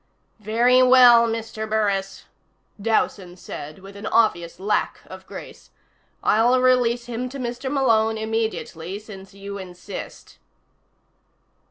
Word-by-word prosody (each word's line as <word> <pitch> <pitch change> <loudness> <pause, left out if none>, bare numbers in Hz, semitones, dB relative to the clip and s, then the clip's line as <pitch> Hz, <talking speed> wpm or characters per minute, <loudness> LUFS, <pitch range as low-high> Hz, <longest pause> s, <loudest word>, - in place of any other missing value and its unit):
"Very 235 +4 +3
well, 250 -2 +7
Mr. 225 -1 -4
Burris," 200 -3 -1 0.6
Dowson 195 -4 -1
said 150 -3 -8
with 195 0 -12
an 200 +1 -7
obvious 175 -8 +1
lack 210 +2 -1
of - - -12
grace. - - -11 0.5
"I'll 240 +4 +3
release 245 -2 +2
him 245 +1 -4
to 275 - -8
Mr. 255 +1 -4
Malone 225 -5 +2
immediately, 220 -5 -3
since 195 -2 -12
you 200 0 -7
insist." 185 +1 -9
220 Hz, 115 wpm, -23 LUFS, 200-240 Hz, 0.6 s, well